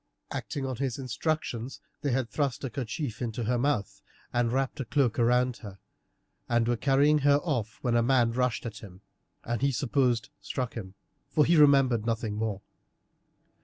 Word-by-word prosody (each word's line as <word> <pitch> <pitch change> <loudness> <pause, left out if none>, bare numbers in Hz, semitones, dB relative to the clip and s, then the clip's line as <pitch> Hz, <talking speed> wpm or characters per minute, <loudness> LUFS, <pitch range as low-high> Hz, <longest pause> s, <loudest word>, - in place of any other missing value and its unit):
Acting 140 -2 -4
on 130 -2 -3
his 130 -2 -2
instructions 130 -2 -3 0.2
they 145 - -1
had 130 -1 0
thrust 140 +2 -2
a 135 - -3
kerchief 130 -1 -4
into 120 -1 -3
her 120 +2 +1
mouth, 130 -6 -1 0.3
and 120 -1 +1
wrapped 135 +2 -1
a 135 - -2
cloak 130 -5 +1
round 125 +1 +3
her, 100 -4 -10 0.7
and 120 -1 +2
were 120 - +2
carrying 140 +4 +3
her 145 0 +4
off 120 - -2
when 120 -2 +1
a 120 - +4
man 120 -1 +3
rushed 125 0 0
at 110 -2 -6
him, 95 -2 -12 0.4
and 120 0 -2
he 140 0 +3
supposed 125 -3 +1
struck 125 -3 -3
him, 95 -4 -7 0.3
for 150 -2 +3
he 170 - +4
remembered 135 -7 +5
nothing 115 -2 -1
more. 105 -2 -3
125 Hz, 170 wpm, -28 LUFS, 115-135 Hz, 0.7 s, remembered